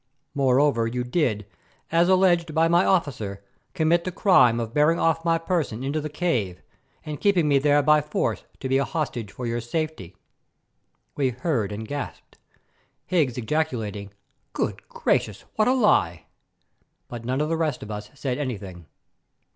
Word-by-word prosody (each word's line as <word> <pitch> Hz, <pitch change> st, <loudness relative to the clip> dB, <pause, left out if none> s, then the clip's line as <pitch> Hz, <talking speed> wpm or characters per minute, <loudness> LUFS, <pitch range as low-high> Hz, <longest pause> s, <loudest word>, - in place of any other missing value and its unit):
Moreover, 135 Hz, -3 st, +2 dB
you 125 Hz, +2 st, -2 dB
did, 125 Hz, -, 0 dB, 0.5 s
as 170 Hz, +2 st, +3 dB
alleged 175 Hz, -4 st, +3 dB
by 165 Hz, +1 st, +4 dB
my 170 Hz, +2 st, +4 dB
officer, 110 Hz, -, -1 dB, 0.3 s
commit 170 Hz, 0 st, +2 dB
the 185 Hz, -, -3 dB
crime 130 Hz, -, +4 dB
of 115 Hz, -1 st, -4 dB
bearing 150 Hz, +3 st, +3 dB
off 165 Hz, 0 st, +1 dB
my 165 Hz, -1 st, +2 dB
person 165 Hz, -, -2 dB
into 145 Hz, +3 st, -1 dB
the 155 Hz, -, -4 dB
cave 125 Hz, -, -1 dB, 0.5 s
and 150 Hz, -2 st, -6 dB
keeping 185 Hz, -6 st, +3 dB
me 140 Hz, -2 st, +4 dB
there 145 Hz, +1 st, +3 dB
by 150 Hz, +1 st, +5 dB
force 150 Hz, +1 st, -2 dB, 0.2 s
to 130 Hz, -, -2 dB
be 135 Hz, +1 st, +2 dB
a -, -, +2 dB
hostage 135 Hz, -10 st, -3 dB
for 125 Hz, -, -6 dB
your 120 Hz, 0 st, -2 dB
safety." 120 Hz, -, -4 dB, 1.0 s
We 135 Hz, -3 st, +1 dB
heard 125 Hz, -, -1 dB
and 110 Hz, +2 st, -6 dB
gasped, 145 Hz, +1 st, -7 dB, 0.7 s
Higgs 150 Hz, -10 st, +1 dB
ejaculating, 110 Hz, -7 st, -2 dB, 0.4 s
"Good -, -, -3 dB
gracious, -, -, 0 dB
what 215 Hz, -, +2 dB
a 255 Hz, -, +4 dB
lie!" 95 Hz, -, +2 dB, 0.8 s
But 120 Hz, -2 st, -8 dB
none 130 Hz, +3 st, -1 dB
of 150 Hz, +1 st, 0 dB
the 165 Hz, -, +1 dB
rest 155 Hz, -5 st, -1 dB
of 105 Hz, -, -8 dB
us 105 Hz, 0 st, -6 dB
said 135 Hz, -1 st, -3 dB
anything. 100 Hz, -, -6 dB
140 Hz, 160 wpm, -24 LUFS, 115-165 Hz, 1.0 s, by